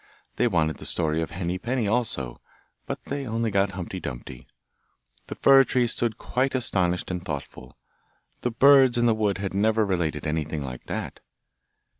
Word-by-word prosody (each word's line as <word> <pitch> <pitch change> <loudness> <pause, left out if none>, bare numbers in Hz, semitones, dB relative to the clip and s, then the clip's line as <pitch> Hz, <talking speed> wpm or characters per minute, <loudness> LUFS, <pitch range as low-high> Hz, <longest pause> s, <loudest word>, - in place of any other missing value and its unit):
They 120 - +3
wanted 80 -7 +1
the - - -8
story 80 -1 0
of 80 - -3
Henny 90 +1 -3
Penny 120 +1 -1
also, 105 - -2 0.5
but - - -5
they 140 -1 -4
only 115 0 -1
got 100 -1 +1
Humpty 95 0 -5
Dumpty. 65 -4 -8 0.8
The - - -6
fir 135 0 +6
tree 125 -1 +1
stood 115 -1 -2
quite 130 +4 -1
astonished 90 -8 0
and 90 -1 -4
thoughtful; 70 -5 -7 0.6
the 125 - 0
birds 130 +1 +6
in 120 - +3
the 115 - +4
wood 105 -3 0
had 95 0 -4
never 110 +2 +2
related 85 -6 -1
anything 75 -1 -2
like 65 -2 -7
that. - - -5
100 Hz, 165 wpm, -25 LUFS, 80-120 Hz, 0.8 s, fir